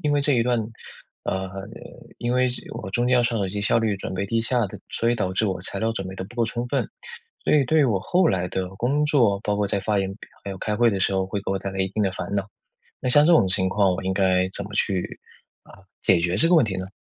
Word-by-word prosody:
因 150 - +1
为 145 -1 +2
这 145 0 +3
一 120 -2 +3
段 120 0 +1 0.7
呃， 95 0 -2 0.7
因 120 +1 -2
为 125 0 +3
这 125 - -5
我 115 -4 -6
中 120 +5 0
间 125 - +4
要 125 - +4
刷 120 -1 0
手 100 -3 0
机， 100 +2 -3
效 100 - +2
率 110 -2 +1
准 95 - -4
备 100 - -1
低 115 +3 0
下 120 -1 +1
的， - - -10
所 115 +1 0
以 - - +2
导 95 -4 -2
致 110 - +1
我 95 -2 -2
材 - - -3
料 115 0 0
准 95 -4 -4
备 95 - -7
得 95 - -4
不 115 +5 -13
够 120 -2 +1
充 120 +2 -3
分。 125 -3 -1 0.6
所 - - +2
以 150 -2 +5
对 155 +4 +3
于 145 - +5
我 105 -7 +2
后 180 - +2
来 90 -2 0
的 95 0 -3
工 140 +8 +1
作， 120 -10 +3
包 105 0 0
括 105 -1 +1
在 100 - -1
发 105 0 0
言 95 0 -2 0.3
还 100 - -4
有 - - -7
开 105 +2 -2
会 120 0 +4
的 95 - -2
时 95 - +2
候 95 0 0
会 100 +1 -3
给 - - -3
我 95 - 0
带 100 0 -4
来 95 - -3
一 95 - +1
定 105 - -3
的 95 -3 +1
烦 100 - -5
恼。 100 0 -2 0.5
那 - - -3
像 145 +4 +6
这 - - +6
种 155 - +5
情 95 0 +1
况， 100 -1 +2
我 95 - -4
应 95 - -1
该 95 -1 +2
怎 100 - -2
么 105 - -10
去， 95 -3 -1 0.4
啊， 95 - -17 0.2
解 95 - +4
决 85 +1 0
这 145 +12 +3
个 180 - +6
问 155 - +5
题 100 -3 -3
呢？ 95 - -4
105 Hz, 315 characters per minute, -24 LUFS, 95-120 Hz, 0.7 s, 像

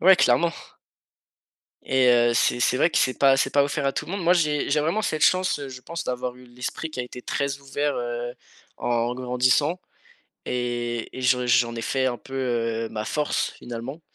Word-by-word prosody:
Ouais, 190 +1 +7
clairement. 135 +7 +3 1.3
Et 130 -1 +2
heu, 120 -1 +4
c'est 120 +1 +2
c'est 125 - +2
vrai 165 - +3
que - - +1
c'est 130 - +1
pas 135 -1 +5
c'est - - +1
pas 140 - +4
offert 140 0 -1
à 135 - +1
tout - - -3
le 175 - -7
monde. 200 -1 -3
Moi 170 +1 +4
j'ai 155 -5 +1
j'ai 150 +1 +3
vraiment 165 +9 0
cette 155 -6 -1
chance, 185 -2 +3
heu, 140 - -6
je 130 -1 -9
pense 170 +5 -6
d'avoir 125 0 -3
eu 125 0 -15
l'esprit 125 +6 -6
qui 155 - -9
a - - 0
été 125 0 -10
très 140 +2 -2
ouvert, 140 +1 -2
heu, 120 0 -4 0.4
en 120 0 0
grandissant 130 +7 +1 0.6
et 120 -1 -2
et - - -5
j'en 125 0 +2
j'en 120 -1 +3
ai 115 - -4
fait 130 +2 0
un 120 -2 -1
peu, 135 - -11
heu, 115 -3 -1
ma 110 -1 -4
force, 150 +6 -1
finalement. 120 +6 -7
130 Hz, 210 wpm, -24 LUFS, 120-145 Hz, 1.3 s, Ouais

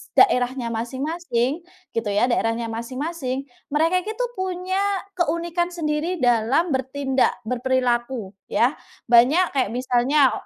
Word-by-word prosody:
daerahnya 250 -8 +3
masing-masing 260 +3 -2 0.4
gitu 230 -1 -1
ya, 205 +3 +2
daerahnya 230 0 0
masing-masing, 260 +3 -4 0.2
mereka 325 +5 +2
itu 435 +6 -3
punya 375 0 -2 0.4
keunikan 345 0 0
sendiri 325 +1 -2
dalam 245 +8 +3
bertindak, 265 0 +1
berperilaku 245 -2 -1 0.2
ya. 250 +5 +2 0.4
Banyak 280 +9 +5
kayak 255 -6 +1
misalnya, 255 +3 +3
265 Hz, 105 wpm, -23 LUFS, 240-335 Hz, 0.4 s, Banyak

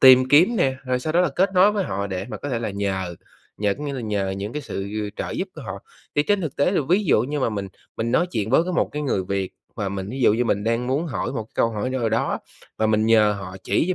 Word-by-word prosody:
tìm 130 0 +8
kiếm 175 - +5
nè, 135 -7 +2
rồi 125 0 0
sau 155 +4 -2
đó 175 - +4
là 180 - +3
kết 190 +2 +3
nối 195 +3 +6
với 200 -3 0
họ 100 +1 -2
để 95 0 -3
mà - - -5
có 145 - -6
thể 120 -3 -1
là 115 -3 -3
nhờ, 95 -3 -2 0.4
nhờ 100 -1 +1
có 150 - -5
nghĩa 140 - -3
là 130 - -4
nhờ 105 -4 -1
những 100 +3 -4
cái 150 0 -4
sự 95 0 -5 0.3
trợ - - -3
giúp 190 - -3
của 155 - -8
họ. 100 -4 -5 0.4
Thì 145 - +5
trên 205 +4 +1
thực 160 -6 -4
tế 145 - +3
là 190 - +2
ví 195 +4 +3
dụ 115 -9 +4
như 145 +3 -2
mà 130 - +2
mình 100 -2 -3 0.3
mình 115 +1 -1
nói 175 - +3
chuyện 110 0 -1
với 150 +6 +4
cái 180 - -3
một - - +1
cái 150 - -3
người 100 -10 0
Việt 95 0 -2 0.2
và 105 -4 -1
mình 95 0 -4
ví 135 +1 -5
dụ 110 - +5
như 120 +2 +1
mình 100 -2 0
đang 115 +2 0
muốn 145 +6 0
hỏi 130 - -3
một 115 -5 -2
cái - - -27
câu 115 - +3
hỏi 110 +4 -2
nào 125 -3 0
đó, 115 +2 0 0.4
và 110 - +3
mình 110 0 +2
nhờ 110 -2 +5
họ 95 -1 -7
chỉ - - +2
cho 185 - +2
120 Hz, 295 wpm, -23 LUFS, 100-150 Hz, 0.4 s, tìm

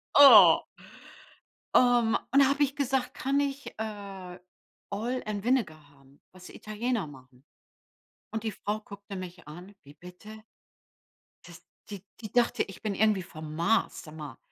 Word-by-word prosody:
Oh. 285 -1 +9 1.2
Ähm, 240 -2 +4
und 275 - +5
da 275 - +7
habe 285 +1 +2
ich 280 0 -1
gesagt: 265 -2 -1
„Kann 275 +2 -1
ich, 280 0 -3
äh, 195 -4 -7 0.5
Oil 240 +5 -3
and 205 -2 -4
Vinegar 175 - -1
haben, 140 -1 -24
was 185 -1 -14
Italiener 215 -2 -3
machen?“ 130 -1 -16 0.9
Und 220 0 -5
die 220 - -2
Frau 210 +2 -4
guckte 200 -1 -10
mich 180 -3 -9
an: 180 +6 -11
„Wie 145 - -15
bitte?“ 180 +7 -13 1.0
Das - - -13 0.3
die 200 -3 -8 0.2
die 215 -3 -8
dachte, 240 -1 +2
ich 195 - -12
bin 210 -3 -3
irgendwie 210 -3 +2
vom 155 -3 -9
Mars. 200 +8 0
Sag 155 0 -12
mal. 150 -2 -9
205 Hz, 150 wpm, -28 LUFS, 175-240 Hz, 1.2 s, Oh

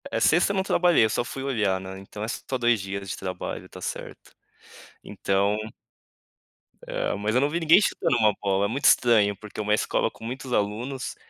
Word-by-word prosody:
É, - - -1
sexta 175 +5 +3
eu - - -2
não 190 - +1
trabalhei. 175 - +4
Eu - - 0
só 115 - 0
fui 130 +2 -6
olhar, 105 -8 0
né. 95 0 -8
Então, 105 +2 -8
é - - -3
só 130 +3 -4
2 120 -2 +2
dias 100 0 -5
de - - -4
trabalho. 90 -1 -6
Tá - - -11
certo. - - -7 0.7
Então 100 +1 0 1.3
eh, - - -2
mas 105 +3 -1
eu 130 - +4
não 145 - +2
vi 170 +3 -1
ninguém 165 +4 +6
chutando 140 - +1
uma 110 -2 +4
bola. 100 0 +1
Muito 130 +7 -3
estranho, 110 -4 +5
porque 105 0 -7
uma 105 0 +1
escola 105 - +1
com - - -16
muitos 130 +2 -5
alunos, 120 +6 -2
110 Hz, 195 wpm, -25 LUFS, 100-135 Hz, 1.3 s, ninguém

